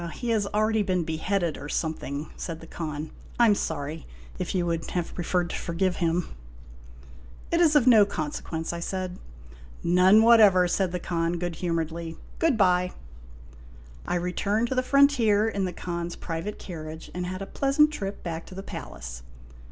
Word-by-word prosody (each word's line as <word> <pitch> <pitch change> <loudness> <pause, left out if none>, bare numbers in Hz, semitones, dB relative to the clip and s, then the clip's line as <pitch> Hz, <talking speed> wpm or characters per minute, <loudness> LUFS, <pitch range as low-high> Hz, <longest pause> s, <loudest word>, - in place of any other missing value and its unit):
" - - -10
He 240 - -4
has 215 -3 +1
already 215 +1 +1
been 185 -3 0
beheaded, 165 +1 -1
or 145 - -7
something," 150 -2 -3
said 165 -2 -5
the 165 - -11
Khan. 155 -2 -5
" - - -20
I 240 - +7
'm 215 - +6
sorry, 155 -4 -4 0.3
if 185 +1 -3
you 180 -2 +1
would 165 -1 -2
have 175 -2 -3
preferred 175 0 -1
to - - -3
forgive 175 +1 -1
him." 170 0 0 0.6
" 60 0 -19
It 335 +1 +3
is 310 -3 +5
of 285 -5 +5
no 230 -5 +8
consequence," 160 -1 -4
I 170 - -4
said. 185 +1 -4 0.4
" - - -18 0.2
None 185 +5 +6
whatever," 210 -6 +7
said 185 0 0
the 180 - -2
Khan 170 0 -1
good 175 -1 -3
humoredly. 165 -1 -3
". - - -20
Good 325 -7 +3
by." 180 -2 +3 1.1
I - - 0
returned 200 +6 0
to - - 0
the 255 - +3
frontier 255 -6 +4
in 200 -3 -1
the 180 - -2
Khan's 170 0 -4
private 165 +5 -5
carriage, 160 -2 -8
and 180 0 -3
had 185 +2 -4
a - - -5
pleasant 280 +6 +3
trip 200 -8 -5
back 165 -1 -5
to 185 - -11
the 195 - -6
palace. 60 - -8
180 Hz, 185 wpm, -26 LUFS, 165-205 Hz, 1.1 s, no